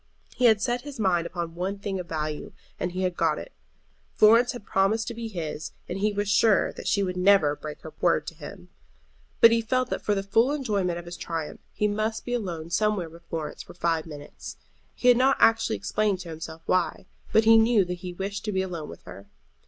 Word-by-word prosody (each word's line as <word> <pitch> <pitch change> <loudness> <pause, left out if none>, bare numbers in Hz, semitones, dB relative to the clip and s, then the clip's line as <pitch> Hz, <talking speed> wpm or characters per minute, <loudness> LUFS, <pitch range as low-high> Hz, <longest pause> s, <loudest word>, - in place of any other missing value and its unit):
He 250 - +1
had 220 -3 +6
set 240 +1 0
his 280 -2 -9
mind 175 -5 +1
upon 170 -2 -5
one 185 +4 -3
thing 195 -1 -4
of 175 - -7
value, 155 -1 -4 0.3
and 180 - -2
he 185 +1 -2
had 180 -1 -1
got - - +1
it. - - -8 0.6
Florence 230 +3 +5
had 240 -4 -9
promised 215 +4 +1
to - - -5
be 230 0 -5
his, 160 -6 -5
and 180 +2 -4
he 210 +2 +1
was 205 0 -2
sure 205 0 +3
that - - -8
she 200 - +2
would 180 -1 -2
never 180 -6 +4
break 150 0 -8
her 160 - -10
word 165 -3 +2
to 165 - -6
him. 165 +3 -11 0.7
But 230 - +9
he 230 0 +3
felt 255 +2 0
that - - -2
for 205 - 0
the 195 - -1
full 225 +7 +3
enjoyment 200 -11 -1
of 175 - -8
his 175 0 -8
triumph 165 -3 -5
he 210 - 0
must 215 +2 -2
be 245 - -3
alone 170 -8 -4
somewhere 200 -3 0
with 170 +1 -16
Florence 155 -2 -4
for - - -13
five 165 -2 0
minutes. 145 -2 -9 0.4
He 250 - -1
had 245 -1 +7
not 265 +2 +4
actually 225 - +4
explained 190 - 0
to 175 - -9
himself 160 0 -8
why, 185 - 0 0.3
but 220 - +5
he 225 +1 +7
knew 225 -3 +5
that 180 0 -5
he 180 - -5
wished 195 +3 -5
to 210 - -1
be 190 -1 0
alone 170 -5 -5
with - - -11
her. 100 +1 -11
190 Hz, 225 wpm, -26 LUFS, 170-220 Hz, 0.7 s, But